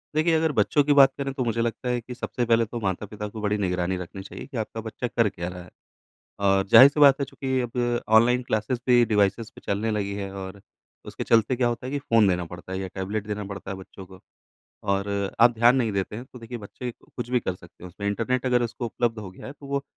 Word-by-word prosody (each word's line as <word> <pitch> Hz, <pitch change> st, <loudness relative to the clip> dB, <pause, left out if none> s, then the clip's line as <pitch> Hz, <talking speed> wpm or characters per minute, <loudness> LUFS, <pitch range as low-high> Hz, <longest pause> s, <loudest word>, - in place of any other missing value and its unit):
देखिए 165 Hz, +2 st, +3 dB
अगर 160 Hz, 0 st, +2 dB
बच्चों 145 Hz, 0 st, +2 dB
की 145 Hz, 0 st, +3 dB
बात 135 Hz, -1 st, +7 dB
करें 140 Hz, -1 st, -2 dB
तो 130 Hz, -, -2 dB
मुझे 115 Hz, 0 st, 0 dB
लगता 120 Hz, +2 st, -2 dB
है 125 Hz, 0 st, 0 dB
कि 125 Hz, +2 st, -8 dB
सबसे 120 Hz, 0 st, -3 dB
पहले 115 Hz, 0 st, +3 dB
तो 120 Hz, +2 st, -6 dB
माता-पिता 105 Hz, +2 st, -3 dB
को 110 Hz, +1 st, -8 dB
बड़ी 105 Hz, 0 st, 0 dB
निगरानी 90 Hz, -2 st, -1 dB
रखनी 90 Hz, +2 st, -7 dB
चाहिए 95 Hz, -, -9 dB
कि 140 Hz, -3 st, -7 dB
आपका 110 Hz, 0 st, -4 dB
बच्चा 115 Hz, +3 st, -4 dB
कर 115 Hz, -2 st, +1 dB
क्या 85 Hz, -3 st, -6 dB
रहा 90 Hz, 0 st, -8 dB
है? 90 Hz, -, -15 dB, 0.7 s
और 95 Hz, -1 st, +2 dB
ज़ाहिर 130 Hz, -, +10 dB
सी 150 Hz, -, -3 dB
बात 140 Hz, -1 st, +7 dB
है 140 Hz, -, +2 dB
चूँकि 130 Hz, -1 st, -2 dB
अब 120 Hz, 0 st, -1 dB, 0.2 s
ऑनलाइन 125 Hz, +2 st, +3 dB
क्लासेज़ 115 Hz, +1 st, -1 dB
भी 120 Hz, -1 st, +5 dB
डिवाइसेज़ 105 Hz, +1 st, +1 dB
पे -, -, -13 dB
चलने 105 Hz, +3 st, -1 dB
लगी 100 Hz, -2 st, -2 dB
है 100 Hz, -1 st, -4 dB
और 95 Hz, +1 st, -8 dB, 0.5 s
उसके -, -, -6 dB
चलते 115 Hz, +2 st, +3 dB
क्या 120 Hz, -1 st, +2 dB
होता 120 Hz, +1 st, -4 dB
है -, -, -4 dB
कि 145 Hz, -, 0 dB
फ़ोन 115 Hz, -7 st, +3 dB
देना 90 Hz, -1 st, 0 dB
पड़ता 90 Hz, +2 st, -10 dB
है 95 Hz, -, -2 dB
या 95 Hz, 0 st, -4 dB
टैबलेट 100 Hz, +2 st, -3 dB
देना 105 Hz, 0 st, -4 dB
पड़ता 100 Hz, -1 st, -7 dB
है 100 Hz, -, -4 dB
बच्चों 95 Hz, 0 st, -11 dB
को। 95 Hz, 0 st, -15 dB, 0.7 s
और 100 Hz, 0 st, +1 dB, 0.3 s
आप 120 Hz, +1 st, +7 dB
ध्यान 120 Hz, +2 st, +5 dB
नहीं 120 Hz, -4 st, +1 dB
देते 100 Hz, +1 st, -2 dB
हैं 120 Hz, -, -7 dB
तो 125 Hz, -, -14 dB
देखिए 115 Hz, +1 st, -7 dB
बच्चे 120 Hz, +3 st, -7 dB
कुछ 120 Hz, -1 st, -8 dB
भी 125 Hz, 0 st, +2 dB
कर 95 Hz, -5 st, -3 dB
सकते 90 Hz, 0 st, -17 dB
हैं -, -, -7 dB
उसमें। 100 Hz, +3 st, -5 dB
इंटरनेट 120 Hz, +5 st, -1 dB
अगर 125 Hz, -1 st, +3 dB
उसको 120 Hz, +1 st, -4 dB
उपलब्ध 115 Hz, -1 st, -1 dB
हो 95 Hz, -3 st, -8 dB
गया -, -, -12 dB
है -, -, -6 dB
तो 145 Hz, -, -15 dB
वो 140 Hz, 0 st, -2 dB
115 Hz, 250 wpm, -25 LUFS, 100-125 Hz, 0.7 s, ज़ाहिर